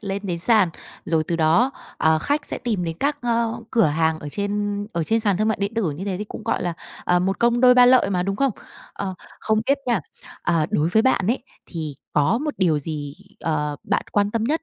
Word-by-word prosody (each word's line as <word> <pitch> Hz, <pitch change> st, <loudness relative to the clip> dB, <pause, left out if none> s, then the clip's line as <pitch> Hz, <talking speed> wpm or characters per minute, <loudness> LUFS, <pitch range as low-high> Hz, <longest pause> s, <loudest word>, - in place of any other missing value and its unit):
lên 200 Hz, -1 st, -4 dB
đến 175 Hz, -3 st, -2 dB
sàn. 210 Hz, +1 st, +4 dB, 0.4 s
Rồi 160 Hz, -1 st, +1 dB
từ 170 Hz, -, -2 dB
đó, 165 Hz, +11 st, +3 dB, 0.3 s
ờ, 160 Hz, 0 st, +3 dB
khách 285 Hz, -, -1 dB
sẽ -, -, -4 dB
tìm 215 Hz, -7 st, -2 dB
đến 165 Hz, 0 st, -4 dB
các 290 Hz, +1 st, 0 dB, 0.5 s
cửa 230 Hz, -4 st, +4 dB
hàng 160 Hz, +1 st, +1 dB
ở 150 Hz, -, -7 dB
trên 205 Hz, +3 st, -2 dB
ở 170 Hz, -, -1 dB
trên 225 Hz, +6 st, +1 dB
sàn 205 Hz, -4 st, +2 dB
thương 215 Hz, +2 st, +1 dB
mại 220 Hz, -, +1 dB
điện 200 Hz, +3 st, -2 dB
tử 210 Hz, -8 st, 0 dB
như 150 Hz, +6 st, -6 dB
thế 195 Hz, -2 st, -2 dB
thì 210 Hz, -, -3 dB
cũng, 215 Hz, -, -9 dB
gọi 225 Hz, -, 0 dB
là, 175 Hz, -1 st, -1 dB, 0.3 s
ờ, 180 Hz, -, +3 dB
một 190 Hz, +2 st, -1 dB
công 235 Hz, 0 st, +2 dB
đôi 250 Hz, -1 st, +7 dB
ba 250 Hz, -1 st, +7 dB
lợi 250 Hz, -5 st, +5 dB
mà, 180 Hz, -2 st, +1 dB
đúng 195 Hz, +1 st, -2 dB
không? 275 Hz, -3 st, +2 dB, 0.4 s
Ờ, 190 Hz, -2 st, -4 dB, 0.3 s
không 220 Hz, 0 st, +1 dB
biết 275 Hz, +1 st, +3 dB
nha, 235 Hz, -6 st, +2 dB, 0.4 s
ờ, 165 Hz, -3 st, +1 dB
đối 155 Hz, +2 st, +1 dB
với 220 Hz, +5 st, +3 dB
bạn 225 Hz, -7 st, +2 dB
ấy, 235 Hz, +3 st, 0 dB, 0.2 s
thì 155 Hz, -4 st, -5 dB, 0.2 s
có 145 Hz, +10 st, +2 dB
một 300 Hz, +2 st, -3 dB
điều 170 Hz, -6 st, +2 dB
gì, 145 Hz, -1 st, -5 dB, 0.3 s
ờ, 150 Hz, -2 st, -1 dB
bạn -, -, 0 dB
quan 205 Hz, 0 st, +2 dB
tâm 225 Hz, 0 st, -1 dB
nhất 310 Hz, +7 st, 0 dB
200 Hz, 235 wpm, -22 LUFS, 165-230 Hz, 0.5 s, đôi